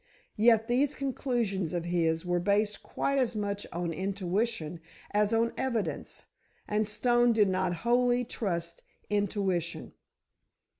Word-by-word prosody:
Yet 225 0 +5
these 270 +4 +2
conclusions 235 - -1
of 170 -1 -2
his 165 -1 0
were 175 0 +1
based 205 +3 +1
quite 275 0 -1
as 240 -3 0
much 205 -1 -3
on 170 0 -2
intuition 190 -1 -2 0.3
as 210 +1 +2
on 230 +1 +2
evidence, 240 -5 -2 0.4
and 210 0 +1
Stone 240 +3 +3
did 210 -3 +4
not 185 -1 0
wholly 245 +1 +3
trust 170 -7 -3 0.3
intuition. 195 -4 -1
210 Hz, 120 wpm, -29 LUFS, 180-235 Hz, 0.4 s, Yet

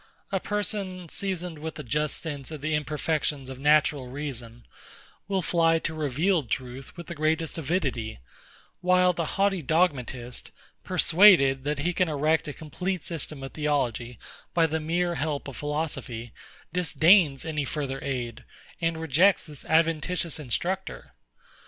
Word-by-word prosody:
A 195 - +1
person, 195 -3 -2
seasoned 180 -4 -3
with 160 0 -6
a 150 - -6
just 150 +4 0
sense 145 -5 -5
of 155 -3 -7
the 155 +1 -1
imperfections 150 -2 -1
of 130 - -8
natural 145 -2 +3
reason, 125 -4 -6 0.6
will 195 -2 0
fly 165 -1 +3
to 165 0 -3
revealed 155 - 0
truth 130 +4 -4
with 170 - -7
the 170 - -6
greatest 155 +1 0
avidity: 135 -9 -1 0.6
While 180 0 +4
the 170 +1 -3
haughty 195 -2 +2
Dogmatist, 130 -6 0 0.3
persuaded 150 -8 +5
that 150 0 0
he 170 +6 0
can 180 -1 +1
erect 155 +2 +1
a - - -3
complete 180 +5 -4
system 155 -4 -4
of 135 - -6
Theology 125 -6 -1 0.4
by 165 -1 +5
the 160 0 -1
mere 170 +3 0
help 150 -3 -2
of 135 - -7
philosophy, 145 -6 -4 0.4
disdains 165 -3 +4
any 155 -2 -1
further 135 -1 -3
aid, 125 -5 -3 0.4
and 165 -1 0
rejects 160 +5 +4
this 150 -4 -8
adventitious 165 +1 +1
instructor. 180 +8 -3
155 Hz, 140 wpm, -27 LUFS, 140-175 Hz, 0.6 s, persuaded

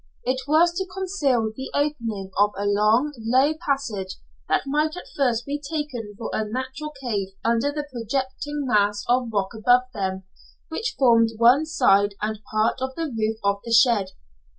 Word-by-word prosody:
It 260 +1 -1
was 330 +4 +4
to 380 - -2
conceal 295 - 0
the 265 - -6
opening 230 -10 -2
of 205 0 +4
a 200 - -2
long, 215 +8 +3
low 260 +7 +3
passage 235 -10 -2 0.3
that - - +2
might 300 +4 0
at - - -8
first 245 -4 +1
be 290 +1 -3
taken 275 -8 -5
for 230 - -5
a 220 - 0
natural 260 +7 -5
cave 215 -7 -2 0.2
under 235 +5 +2
the 295 0 -4
projecting 265 +5 -3
mass 205 -3 +2
of 245 0 +2
rock 200 -3 -1
above 245 +3 +4
them, 190 -2 -3 0.5
which 445 +8 -3
formed 230 -3 +4
one 250 +7 +5
side 205 -10 +3
and 215 0 -3
part 215 +4 +1
of 260 0 -3
the 325 -5 -3
roof 220 0 -1
of 200 0 +1
the 230 - -6
shed. 230 -4 +5
245 Hz, 170 wpm, -24 LUFS, 215-285 Hz, 0.5 s, one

